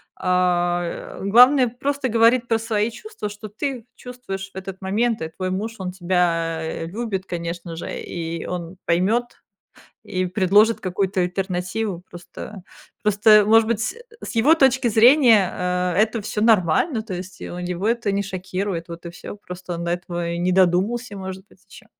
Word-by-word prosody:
а, 175 Hz, -1 st, 0 dB
главное 250 Hz, +6 st, +6 dB
просто 275 Hz, +2 st, -2 dB
говорить 235 Hz, +2 st, +4 dB
про 225 Hz, -1 st, +1 dB
свои 220 Hz, 0 st, -1 dB
чувства, 410 Hz, -, -7 dB
что 205 Hz, +1 st, -9 dB
ты 245 Hz, +3 st, -4 dB
чувствуешь 195 Hz, -7 st, -7 dB
в -, -, -40 dB
этот 190 Hz, 0 st, -7 dB
момент. 220 Hz, +3 st, 0 dB
И 160 Hz, -, -3 dB
твой 185 Hz, +3 st, -4 dB
муж, 215 Hz, +5 st, -3 dB
он 185 Hz, -1 st, -4 dB
тебя 165 Hz, -3 st, -1 dB
любит, 195 Hz, 0 st, -4 dB
конечно 170 Hz, -1 st, -5 dB
же, 165 Hz, -, -6 dB
и 165 Hz, -1 st, -5 dB
он 180 Hz, 0 st, -5 dB
поймёт, 190 Hz, +8 st, +2 dB, 0.8 s
и 185 Hz, 0 st, -2 dB
предложит 205 Hz, +4 st, +3 dB
какую-то 190 Hz, 0 st, -1 dB
альтернативу. 185 Hz, +1 st, -2 dB
Просто 180 Hz, +3 st, -10 dB, 0.4 s
просто, 210 Hz, 0 st, +5 dB
может 225 Hz, 0 st, +5 dB
быть, 230 Hz, -2 st, 0 dB
с 245 Hz, -, -2 dB, 0.3 s
с -, -, -6 dB
его 265 Hz, +8 st, +5 dB
точки 265 Hz, -4 st, +3 dB
зрения, 225 Hz, -, +6 dB
а, 180 Hz, 0 st, -1 dB
это 220 Hz, +1 st, +2 dB
всё 210 Hz, +1 st, -3 dB
нормально, 220 Hz, -, +3 dB
то 215 Hz, -4 st, -7 dB
есть, 180 Hz, 0 st, -8 dB
у 175 Hz, -, -6 dB
него 180 Hz, +3 st, -3 dB
это 230 Hz, -3 st, 0 dB
не 200 Hz, +1 st, 0 dB
шокирует, 185 Hz, -2 st, -4 dB
вот 170 Hz, +1 st, -9 dB
и 170 Hz, -, -5 dB
всё, 205 Hz, -, -9 dB
просто 180 Hz, -2 st, -8 dB
он 170 Hz, -, -5 dB
до 170 Hz, -, -1 dB
этого 175 Hz, -1 st, -3 dB
и 170 Hz, -, -3 dB
не 180 Hz, +1 st, +1 dB
додумался, 190 Hz, +6 st, +1 dB
может 190 Hz, 0 st, -7 dB
быть, 190 Hz, -, -24 dB
ещё. -, -, -14 dB
190 Hz, 165 wpm, -22 LUFS, 180-225 Hz, 0.8 s, главное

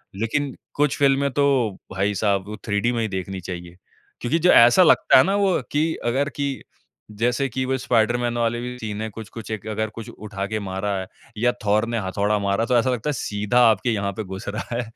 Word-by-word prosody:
लेकिन, 130 Hz, +7 st, -2 dB, 0.2 s
कुछ 145 Hz, -1 st, +1 dB
फ़िल्में 140 Hz, 0 st, +3 dB
तो 130 Hz, -7 st, +1 dB
भाई 95 Hz, +2 st, 0 dB
साहब 100 Hz, -1 st, 0 dB
वो 105 Hz, -, -6 dB
3D 105 Hz, +4 st, +1 dB
में 115 Hz, -, -1 dB
ही 110 Hz, -, 0 dB
देखनी 95 Hz, -1 st, -4 dB
चाहिए। 90 Hz, -1 st, -7 dB, 0.5 s
क्योंकि 130 Hz, +8 st, +1 dB
जो 180 Hz, +2 st, +5 dB
ऐसा 120 Hz, +10 st, +7 dB
लगता 165 Hz, -, +5 dB
है 130 Hz, -, +7 dB
ना 195 Hz, +2 st, +1 dB
वो 200 Hz, -2 st, +2 dB
कि 155 Hz, +2 st, +1 dB
अगर 135 Hz, +5 st, +1 dB
कि 140 Hz, -1 st, -1 dB, 0.7 s
जैसे 125 Hz, +4 st, +1 dB
कि 130 Hz, +2 st, -2 dB
वो 130 Hz, +1 st, 0 dB
स्पाइडरमैन 120 Hz, 0 st, +1 dB
वाले 120 Hz, 0 st, 0 dB
भी 125 Hz, 0 st, -6 dB
सीन 105 Hz, -2 st, -5 dB
हैं 110 Hz, -, -3 dB
कुछ-कुछ 110 Hz, +1 st, -9 dB
एक 110 Hz, -1 st, -5 dB
अगर 110 Hz, 0 st, -2 dB
कुछ 115 Hz, +1 st, -7 dB
उठा 105 Hz, -3 st, -6 dB
के 110 Hz, +1 st, -2 dB
मारा 95 Hz, 0 st, -3 dB
है 95 Hz, -, -5 dB, 0.3 s
या 120 Hz, +3 st, +3 dB
थोर 105 Hz, +2 st, +3 dB
ने 115 Hz, -1 st, -1 dB
हथौड़ा 100 Hz, +3 st, 0 dB
मारा 100 Hz, +3 st, 0 dB
तो 125 Hz, +1 st, +2 dB
ऐसा 120 Hz, +2 st, +2 dB
लगता 125 Hz, +3 st, -2 dB
है -, -, 0 dB
सीधा 105 Hz, -1 st, 0 dB
आपके 110 Hz, +2 st, +1 dB
यहाँ 100 Hz, -2 st, -1 dB
पे 110 Hz, -, -4 dB
घुस 95 Hz, -1 st, -8 dB
रहा 110 Hz, +3 st, -4 dB
है 120 Hz, -, 0 dB
115 Hz, 215 wpm, -23 LUFS, 105-125 Hz, 0.7 s, ऐसा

